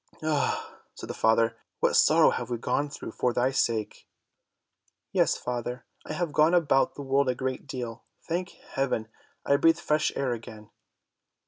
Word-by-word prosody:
"Ah," 155 -2 -1
said - - -8
the - - -4
father, 115 +1 +2 0.2
"what - - +2
sorrow - - +6
we - - -2
have 120 -1 -4
gone 140 +5 0
through 140 - -7
for 125 +1 0
thy 125 +2 +2
sake." 115 -5 -1 1.0
"Yes - - +2
father, 125 0 -4 0.2
I - - -4
have 165 -1 -2
gone 155 +3 +4
about 145 -6 +3
the 145 - -6
world 135 0 +2
a 125 - +1
great 130 +2 -4
deal. 120 -4 -6 0.2
Thank 175 +2 -2 0.2
heaven, 125 -5 -1 0.4
I 140 - +4
breathe 165 +2 +4
fresh 155 -2 +1
air 130 -3 0
again!" 110 -2 -10
130 Hz, 160 wpm, -27 LUFS, 120-145 Hz, 1.0 s, sorrow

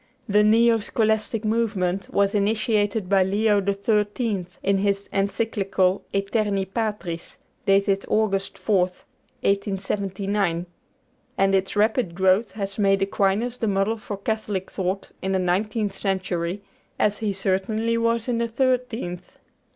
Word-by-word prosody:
The 210 0 +4
"neo 230 +2 +5
scholastic 220 0 0
movement" 205 -4 0
was 200 0 +2
initiated 210 -1 +1
by 195 0 +4
Leo 205 +2 +2
XIII. 205 0 0 0.2
in 195 0 +2
his 200 0 0
Encyclical 195 -2 0
'Æterni 200 -1 -1
Patris,' 210 -7 -3 0.3
dated 195 0 +3
August 195 -3 0
4th, 185 -4 0 0.4
1879, 195 -2 -1 0.7
and 195 0 +3
its 190 +1 +1
rapid 215 -3 +1
growth 190 +4 +2
has 200 -1 -4
made 195 -1 +3
Aquinas 205 +5 0
the 225 - -1
model 195 +2 +1
of 210 -3 -7
Catholic 210 -4 -2
thought 190 +1 -3
in 190 0 -1
the - - +3
nineteenth 200 +3 0
century, 185 -1 -2 0.3
as 210 0 +1
he 215 -2 0
certainly 195 +4 0
was 230 0 +1
in 240 -2 0
the 235 - 0
thirteenth. 235 -7 -2
200 Hz, 125 wpm, -24 LUFS, 195-220 Hz, 0.7 s, neo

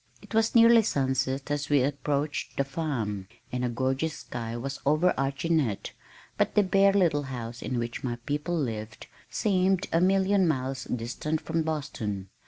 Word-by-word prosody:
It - - -12
was 225 +1 +2
nearly 230 0 +8
sunset 135 -5 -1
as 145 0 -1
we 145 -3 +4
approached 145 +1 -2
the 140 - +3
farm, 130 - -3 0.2
and 125 0 -2
a 125 - +1
gorgeous 130 +6 -1
sky 115 -1 -5
was 135 +3 -5
overarching 155 0 +2
it, 110 -9 -2 0.5
but - - +1
the 210 - +5
bare 195 +1 +4
little 170 -7 +3
house 120 -2 -6
in 130 - -2
which 120 0 -3
my 120 -2 -1
people 150 +4 -1
lived 110 -6 -4 0.2
seemed 190 -2 +1
a 165 - +4
million 190 0 +3
miles 135 -3 -1
distant 125 +6 -2
from 165 +1 -1
Boston. 115 -11 -3
140 Hz, 160 wpm, -28 LUFS, 125-170 Hz, 0.5 s, nearly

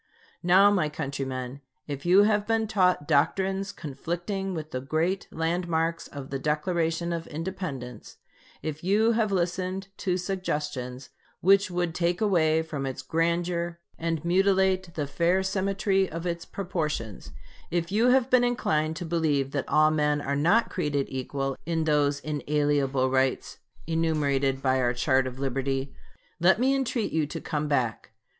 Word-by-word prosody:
Now, 190 +3 +6
my 175 -7 +1
countrymen, 135 -3 -4 0.2
if 145 +2 -5
you 190 +3 +7
have 210 -1 +2
been 225 -1 +1
taught 185 -8 +2
doctrines 190 +6 +1
conflicting 175 +7 -4
with 155 -1 -6
the 130 - -3
great 165 +7 -1
landmarks 165 0 -1
of 140 -2 -9
the 135 - -2
Declaration 165 +3 0
of 165 -1 -4
Independence; 150 - -6 0.5
if 155 0 -4
you 210 +5 +3
have 220 -2 +1
listened 185 +1 -1
to 180 -2 0
suggestions 150 -9 -3 0.3
which 195 +1 +4
would 175 -2 -1
take 175 +1 0
away 160 -6 +3
from 145 -4 -4
its 130 0 -5
grandeur 170 +2 -1 0.2
and 165 -1 -2
mutilate 190 0 +2
the 150 - -1
fair 170 +6 +1
symmetry 195 0 +1
of 165 +2 -6
its 170 -1 -3
proportions; 150 - -4 0.4
if 170 +1 -1
you 220 +4 +3
have 255 -1 +4
been 250 -1 +5
inclined 160 -10 0
to 175 0 -5
believe 155 -5 0
that 140 -2 -3
all 155 0 +4
men 150 -1 +1
are 140 -1 -2
not 175 +11 +3
created 145 -6 -1
equal 135 +1 -3
in 165 -1 0
those 145 -2 +2
inalienable 145 -3 0
rights 130 0 0 0.3
enumerated 145 -5 0
by 130 -1 +2
our 120 -1 +1
chart 130 +1 +2
of 125 0 -7
liberty, 135 0 -2 0.5
let 185 +5 +4
me 265 +2 +3
entreat 255 -4 -1
you 155 -2 0
to - - -5
come 150 -2 -2
back. 125 -6 -1
165 Hz, 150 wpm, -27 LUFS, 140-185 Hz, 0.5 s, you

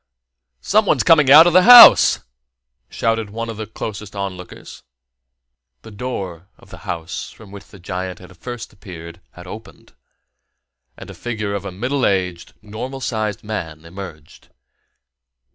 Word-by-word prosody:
"Someone's 210 0 +1
coming 155 -5 +4
out 155 +4 +9
of 175 - +2
his 185 0 +5
house!" 245 -1 +9 0.7
shouted 115 -2 -2
one 115 +2 -6
of 110 - -10
the 110 -1 -6
closest 105 -2 -8
onlookers. 95 -2 -8 1.0
The - - -12
door 100 -7 -7
of - - -21
the - - -11
house 85 +3 -6
from 105 -3 -16
which 100 0 -12
the 100 - -16
giant 90 0 -6
had 90 +1 -16
first 120 +5 -9
appeared 85 -5 -12
had 90 - -13
opened, 105 +3 -13 1.0
and - - -11
the - - -10
figure 110 -4 -5
of 100 -1 -5
a 100 - -6
middle 125 +8 -3
aged, 90 -4 -2
normal 115 +6 -7
sized 110 -3 -4
man 80 -7 -7
emerged. 85 -4 -12
105 Hz, 145 wpm, -19 LUFS, 90-115 Hz, 1.0 s, out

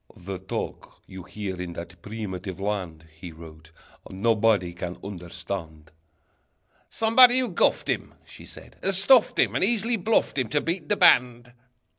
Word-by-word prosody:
"The 95 +1 -7
talk 95 0 -6
you 95 0 -10
hear 95 -1 -6
in 90 -1 -6
that 85 +1 -10
primitive 95 -3 -6
land," 90 -6 -4
He 85 0 -8
wrote, 80 -1 -14 0.4
"nobody 105 -2 +1
can 90 0 -6
understand." 85 -4 -7 1.0
"Somebody 245 +3 +5
who 255 -2 0
guffed 175 - +1
him," - - -3
She - - -13
said, - - -13
"has 190 -1 +2
stuffed 240 +3 +4
him, - - +2
And - - 0
easily 230 +2 +1
bluffed 215 -7 +1
him 125 -4 -2
To 150 - +1
beat 165 -2 -3
the - - +1
band!" 125 0 +3
100 Hz, 150 wpm, -25 LUFS, -, 1.0 s, Somebody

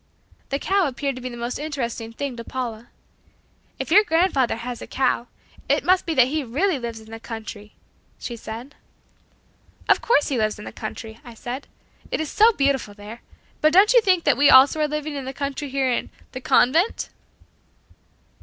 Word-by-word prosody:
The 275 - 0
cow 385 +3 +1
appeared 275 +1 -3
to - - -8
be 255 - -4
the 240 - -9
most 240 +2 -4
interesting 240 -7 -4
thing 270 +2 -4
to 235 - -7
Paula. 240 -2 -5 0.9
"If - - -5
your 415 +5 +7
grandfather 325 - +2
has 240 +1 -6
a - - -8
cow, 255 -2 0 0.4
it - - +2
must 365 0 +3
be 325 - -1
that 255 -3 +6
he 305 +1 -1
really 290 +7 0
lives 235 -2 -5
in 220 0 -15
the 225 - -7
country," 220 -2 -8 0.4
she 240 - -6
said. 230 +5 -8 1.1
"Of - - +4
course 380 -11 +2
he 265 -4 0
lives 215 -1 0
in 210 - -10
the - - -7
country," 220 0 -8
I 240 -1 -12
said, 245 +4 -6 0.4
"it - - -2
is 315 -2 -3
so 440 +2 +6
beautiful 275 - 0
there. 210 +3 -10 0.4
But 310 +1 +4
don't 400 +6 +6
you 485 - +7
think 370 -5 +2
that - - +3
we 285 +1 +5
also 270 +4 +7
are 300 - +2
living 300 0 -4
in 275 -2 -5
the 265 - -5
country 280 +1 -4
here 265 -1 0
in 240 - -2 0.2
'The 255 - -7
Convent'?" 320 - +2
265 Hz, 190 wpm, -23 LUFS, 235-305 Hz, 1.1 s, your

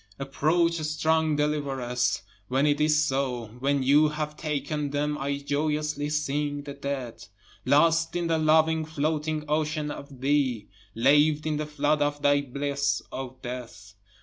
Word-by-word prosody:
Approach 160 +5 +1
strong 155 0 +1
deliveress, 135 -7 -1 0.2
When 135 +3 +1
it 145 0 +2
is 150 0 +4
so, 125 -5 -2
when 140 +1 +1
you 145 +4 +5
have 150 0 -4
taken 150 -1 -2
them 145 +1 -1
I 140 0 -2
joyously 150 +1 -1
sing 145 -1 -1
the 140 -1 -7
dead, 140 -4 -5 0.4
Lost 165 +3 +3
in 175 -1 0
the 165 -1 +1
loving 160 +1 +3
floating 155 0 -2
ocean 150 0 -1
of 140 -3 -10
thee, 135 -6 +1 0.3
Laved 145 +5 +4
in 155 -1 0
the 150 0 -3
flood 150 0 0
of 145 0 -1
thy 145 0 +4
bliss, 140 -4 -1
O 130 -1 -6
death. 120 -6 -8
145 Hz, 145 wpm, -26 LUFS, 140-155 Hz, 0.4 s, you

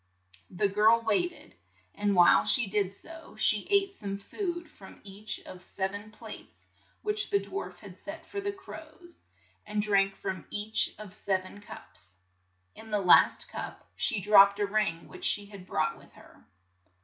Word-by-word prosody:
The 200 +3 +1
girl 215 +4 +4
wait 225 - +2
ed, - - -16 0.4
and 205 -1 0
while 175 -2 +6
she 240 - +3
did 200 -1 0
so, 325 +11 -12
she - - +2
ate 395 -1 +3
some 200 - -5
food 345 - -5
from 200 -11 -15
each 205 +2 -5
of 185 -1 -12
sev 190 0 -3
en 205 +1 -7
plates 220 - -11 0.4
which 420 0 +1
the 400 - +3
dwarf 400 0 -6
had - - -13
set - - -8
for 400 - -5
the 405 0 -2
crows, 345 -3 -12 0.4
and 210 0 -3
drank 195 -2 +2
from 185 - -5
each 210 +1 +1
of 210 -3 -10
sev 190 -2 -1
en 205 +2 -12
cups. 90 - -10 0.6
In 220 - -9
the 210 - +2
last 180 -3 +5
cup - - -7
she 220 -6 +1
dropped 200 0 +6
a 205 - +2
ring 200 -5 -1
which - - -12
she 205 - +2
had 200 -2 -12
brought - - 0
with - - -19
her. - - -19
210 Hz, 175 wpm, -29 LUFS, 195-310 Hz, 0.6 s, while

